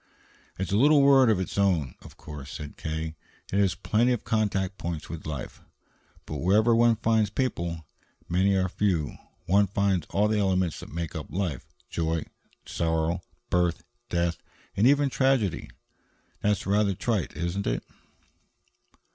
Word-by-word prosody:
"It's 95 -1 -3
a 100 - +3
little 145 +3 +6
world 135 -3 +6
of 105 -4 +3
its 95 +2 -3
own, 85 -10 +2
of - - -14
course," 75 -2 -9
said 75 -1 -7
K., 80 0 -4 0.4
"and 100 - +1
it - - +5
has 95 - +1
plenty 120 +4 +1
of 120 - -3
contact 100 -3 0
points 85 -3 -4
with 80 -2 -7
life. 75 -5 -6 0.6
But - - -5
wherever 110 +6 +3
one 115 0 +5
finds 110 -1 +2
people, 85 - -2 0.4
many 95 +3 +2
or 95 -1 +2
few, 90 -5 0 0.3
one 100 +2 +4
finds 95 -4 0
all 105 +2 +2
the 105 0 +1
elements 95 -4 +1
that - - -10
make 85 -1 -4
up - - -5
life 90 -8 -3 0.2
joy 80 -1 -1
and 80 - -4 0.4
sorrow, 80 +1 -1 0.3
birth 90 -2 +1
and 120 - -42
death, 85 -1 0 0.4
and 105 +5 +4
even 140 0 +4
tragedy. 130 - +1 0.7
That's 105 -2 +1
rather 100 0 +2
trite, 100 -7 -2
isn't 85 +4 -2
it?" - - -1
95 Hz, 160 wpm, -27 LUFS, 85-105 Hz, 0.7 s, little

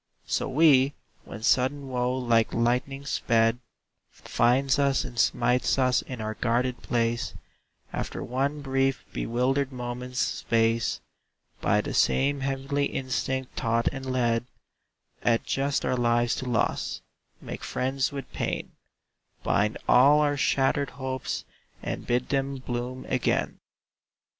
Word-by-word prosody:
So - - -1
we, 140 -1 +5 0.3
when 110 - -9
sudden 135 +3 +2
woe 125 0 -1
like 115 -3 +2
lightning 125 +4 0
sped, 115 -3 +2 0.5
Finds 130 +4 +1
us 140 -2 +2
and 120 -2 -7
smites 125 +3 +2
us 130 -1 +3
in 125 -2 -8
our 110 0 -3
guarded 120 +2 0
place, 120 0 -1 0.6
After - - -4
one 140 +4 -1
brief, 135 -1 0
bewildered 130 +4 0
moment's 125 0 -6
space, 115 -2 +1 0.6
By - - +3
the - - -5
same 140 +1 +2
heavenly 135 +1 -1
instinct 130 0 -3
taught 115 -1 +1
and 135 -1 -7
led, 120 -1 +1 0.7
Adjust 135 +4 0
our - - +1
lives 120 -1 +2
to 130 - -4
loss, 115 - -1 0.4
make - - -7
friends 130 +1 -1
with 140 -1 -6
pain, - - -3 0.7
Bind 105 +1 +1
all 140 +4 +6
our 145 -1 +2
shattered 140 0 +1
hopes 130 -1 -3 0.4
and - - -4
bid 120 +1 0
them 135 0 0
bloom 125 0 -5
again. 130 -2 0
130 Hz, 125 wpm, -27 LUFS, 120-135 Hz, 0.7 s, all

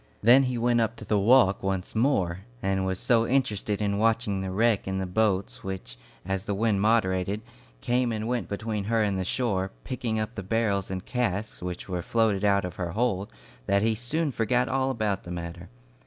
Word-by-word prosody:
Then 120 +5 +7
he 125 - -2
went 120 0 +2
up 115 0 0
to - - -10
the 105 - +2
walk 105 -2 +5
once 95 -1 -2
more, 100 -8 +1 0.2
and 95 -4 0
was 95 0 -2
so 115 -2 +3
interested 105 -6 0
in 100 0 0
watching 110 -3 +1
the 95 - -3
wreck 110 +2 +1
and 95 0 -1
the 95 - -1
boats, 95 0 0
which, 95 -11 -6 0.3
as 95 +1 -2
the 105 -2 -1
wind 105 -1 +1
moderated, 100 -2 +1 0.4
came 125 0 +1
and 110 0 -3
went 125 0 -2
between 105 0 -3
her 115 +1 +2
and 100 -2 0
the - - 0
shore, 95 -2 -1
picking 115 -3 -2
up 110 +2 -3
the 95 - -5
barrels 100 -1 0
and 95 -1 -4
casks 110 -4 -2
which 90 0 -5
were 90 -2 -2
floated 110 0 +1
out 100 -2 +3
of 90 -1 -7
her 90 -2 -3
hold, 105 -3 0 0.4
that 100 +1 +3
he 115 0 +3
soon 145 +7 -1
forgot 125 +1 +1
all 130 0 0
about 110 -6 -1
the - - -11
matter. 85 0 -6
105 Hz, 200 wpm, -27 LUFS, 95-115 Hz, 0.4 s, Then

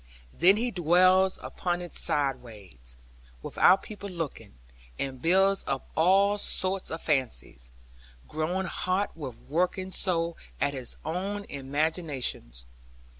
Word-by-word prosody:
Then 190 +4 +5
he 240 +2 -1
dwells 185 +2 +4
upon 175 -1 -2
it 175 -2 -8
sideways, 110 - -1 0.5
without 185 - +4
people 205 -2 -8
looking, 155 - -6 0.4
and 130 -2 -4
builds 190 +4 +3
up 135 -1 -2
all 195 +5 +4
sorts 190 -1 -2
of 160 - -5
fancies, 125 - -1 0.6
growing 170 +5 -1
hot 185 +2 -1
with 135 -7 -7
working 180 +4 -1
so 170 -3 0 0.2
at 140 - +1
his 130 -3 -6
own 195 +6 -2
imaginings. 140 - -2
165 Hz, 115 wpm, -28 LUFS, 135-190 Hz, 0.6 s, Then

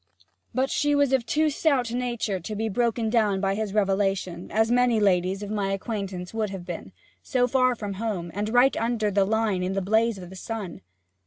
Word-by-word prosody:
But 260 +1 0
she 290 0 +2
was 285 -2 +3
of 250 -3 +1
too 305 +4 +2
stout 275 -5 +1
a - - -2
nature 240 -6 -2
to 210 +5 -6
be 220 +1 -1
broken 230 +1 0
down 210 -5 +2
by 195 0 +1
his 215 0 -2
revelation, 195 -3 0
as 220 +2 +2
many 245 -2 +3
ladies 190 0 +2
of 205 - -6
my 200 -2 -1
acquaintance 195 -3 -4
would 220 -2 -1
have 190 -2 -7
been - - -6 0.3
so 245 -1 +1
far 255 0 +2
from 205 -3 -5
home, 185 -7 -3
and 210 +2 -2
right 245 +4 +4
under 225 -2 0
the 200 0 +3
Line 215 -2 +1
in 185 +1 -1
the 195 - 0
blaze 220 +3 +2
o' 185 - -8
the 185 +2 -11
sun. 205 -3 -6
215 Hz, 210 wpm, -25 LUFS, 195-240 Hz, 0.3 s, right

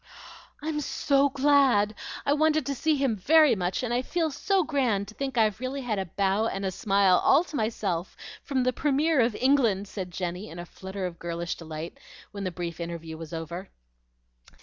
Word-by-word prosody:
"I'm 305 -1 -2
so 280 0 +2
glad! 265 -7 +3 0.3
I 285 - +3
wanted 310 -1 +2
to 280 - -1
see 310 +4 +1
him 270 -5 +1
very 305 - +5
much, 185 +4 -2
and 240 -1 -1
I 245 - +2
feel 325 +3 -1
so 375 +7 +1
grand 250 -10 0
to - - -11
think 270 +1 -4
I've 215 -2 +2
really 260 +2 -3
had 225 -5 -2
a 190 - -3
bow 200 +5 +1
and 195 -2 -3
a 190 - 0
smile 195 -3 +3
all 320 - +5
to 300 -3 -9
myself 205 -7 -2 0.2
from 265 -3 -1
the 255 0 +1
Premier 295 +3 +2
of 230 -1 +1
England," 235 -7 +2
said 190 -2 -5
Jenny 180 +3 -4
in 165 - -10
a 175 - -6
flutter 190 +2 -6
of 175 -2 -6
girlish 170 0 -3
delight 160 0 -7 0.3
when 200 -1 -5
the - - 0
brief 170 -1 -5
interview 165 -1 -5
was 160 -1 -9
over. 170 +3 -6
215 Hz, 195 wpm, -27 LUFS, 180-275 Hz, 0.3 s, very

